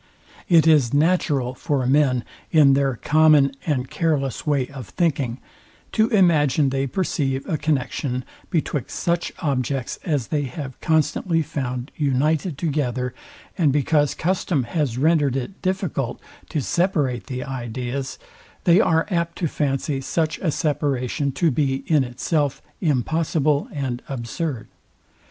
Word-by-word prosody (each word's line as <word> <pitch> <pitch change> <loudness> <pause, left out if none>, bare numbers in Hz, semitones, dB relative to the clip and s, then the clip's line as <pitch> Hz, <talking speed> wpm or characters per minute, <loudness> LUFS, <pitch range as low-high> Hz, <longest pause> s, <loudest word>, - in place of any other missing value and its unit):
It 165 -3 +6
is 145 -6 +4
natural 145 -5 +2
for 135 -1 -1
men, 130 -2 +3 0.3
in 145 -4 +6
their 135 -2 +2
common 150 +2 +4 0.2
and 130 -4 0
care, 155 +2 +1
less 135 +2 -4
way 140 -3 +2
of 130 -7 -9
thinking, 135 - 0 0.5
to 220 0 +3
imagine 155 - +3
they 135 +1 -1
perceive 135 -3 -1
a 175 - 0
connexion 140 -3 -1 0.2
betwixt 150 -5 -2
such 170 0 0
objects 135 -3 -1
as 145 -9 -1
they 145 -2 0
have 130 0 -7
constantly 160 +1 +1
found 130 -3 -4
united 150 +3 0
together; 130 -5 -1 0.5
and 155 -5 +4
because 145 +1 +2
custom 175 -4 0
has 125 -1 -1
rendered 145 -2 +3
it 135 +9 -5
difficult 185 - -2 0.3
to 150 - -1
separate 150 - 0
the 130 -2 -4
ideas, 130 0 -4 0.5
they 175 +2 +5
are 165 -6 +2
apt 170 -1 -1
to 170 - 0
fancy 135 -1 -1
such 160 +3 -1
a 180 - 0
separation 140 -3 -1
to 165 +1 +2
be 135 -1 0
in 150 -4 +3
itself 135 +4 -1 0.2
impossible 155 0 +1
and 130 -4 -3
absurd. 130 0 -4
145 Hz, 135 wpm, -22 LUFS, 130-160 Hz, 0.5 s, It